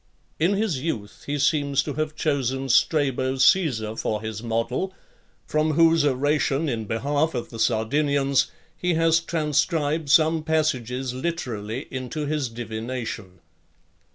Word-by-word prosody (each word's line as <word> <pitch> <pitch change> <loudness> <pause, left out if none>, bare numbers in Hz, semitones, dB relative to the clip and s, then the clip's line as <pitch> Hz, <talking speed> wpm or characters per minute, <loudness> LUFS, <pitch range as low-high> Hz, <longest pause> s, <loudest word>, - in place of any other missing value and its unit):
In 170 +5 +3
his 195 -10 -1
youth, 110 -10 -5
he 145 +1 -1
seems 140 -1 +2
to 145 - -4
have 155 +1 -2
chosen 135 -3 -1
Strabo 130 -1 +2
Caesar 130 - +3
for 110 -1 -2
his 110 0 -5
model; 120 +11 -2 0.5
from 155 0 +1
whose 165 0 +5
oration 145 +2 +1
in 115 -5 -2
behalf 145 +8 0
of 120 - -4
the 115 - -8
Sardinians 140 +5 +2 0.3
he 180 -2 0
has 165 0 +4
transcribed 155 -1 0
some 160 +1 +4
passages 130 -5 -1
literally 125 -5 -4
into 130 +4 -4
his 145 -3 -1
Divination. 110 -4 -6
140 Hz, 125 wpm, -24 LUFS, 120-155 Hz, 0.5 s, whose